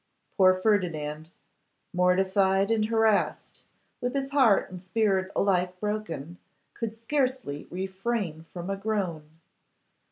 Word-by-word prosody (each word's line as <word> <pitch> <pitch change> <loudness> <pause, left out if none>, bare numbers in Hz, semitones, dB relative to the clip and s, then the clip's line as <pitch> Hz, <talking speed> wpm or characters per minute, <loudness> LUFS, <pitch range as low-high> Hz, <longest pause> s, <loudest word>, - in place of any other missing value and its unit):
Poor 185 -2 +6
Ferdinand, 165 -6 -1 0.6
mortified 190 +2 +3
and 220 -1 +2
harassed, 220 -2 +1 0.4
with 245 +2 -2
his 275 0 -2
heart 260 -8 +4
and 180 -1 -8
spirit 190 -1 0
alike 180 -2 +1
broken, 180 -7 -4 0.3
could 230 -2 -3
scarcely 250 - -2
refrain 190 -2 -3
from 180 +2 -5
a - - 0
groan. 195 -7 -3
195 Hz, 105 wpm, -27 LUFS, 180-220 Hz, 0.6 s, Poor